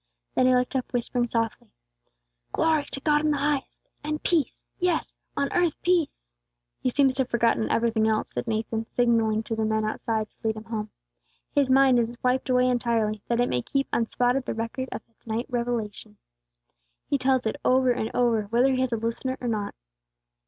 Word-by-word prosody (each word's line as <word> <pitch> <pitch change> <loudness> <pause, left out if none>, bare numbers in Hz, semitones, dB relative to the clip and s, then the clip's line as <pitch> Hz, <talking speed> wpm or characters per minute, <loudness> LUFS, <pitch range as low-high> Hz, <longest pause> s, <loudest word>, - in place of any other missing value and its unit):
Then 255 - +3
he 255 - +5
looked 250 +2 0
up, 255 - -2
whispering 240 0 0
softly, 230 -1 -2 0.9
"Glory 315 -2 +2
to - - -7
God 295 0 +3
in 305 - +2
the 295 - +1
highest 285 -1 -2 0.2
and 305 +1 -3
peace, 330 -5 0
yes, 355 -2 0 0.2
on 280 -1 0
earth 350 -2 +1
peace!" 320 - 0 0.5
"He - - 0
seems 270 +1 +3
to 265 - 0
have 255 - -2
forgotten 230 -1 +2
everything 225 -1 +2
else," 215 -1 0
said - - -4
Nathan, 225 0 -2
signalling 225 -3 +2
to 225 - -3
the 220 - -1
men 220 0 +1
outside 220 0 -1
to - - -41
lead 220 - +1
him 215 - -7
home. 220 -2 -4 0.6
"His 280 -2 +2
mind 265 -1 +5
is 235 +1 -2
wiped 255 +1 +1
away 250 0 +4
entirely, 230 -4 0
that 235 0 0
it 245 - +3
may 125 - 0
keep 275 - -1
unspotted 245 +3 +1
the - - -2
record 230 +3 -3
of - - -5
that 230 0 -34
night's 230 +4 -3
revelation. 235 - -3 0.9
He 280 - +1
tells 260 -1 +2
it 220 - -1
over 255 0 +4
and 225 -2 -1
over, 230 -3 +2
whether 240 +6 +3
he 255 - +1
has 260 -1 0
a 230 - 0
listener 230 +4 -2
or 245 - -4
not." 210 -3 -2
245 Hz, 195 wpm, -26 LUFS, 225-265 Hz, 0.9 s, he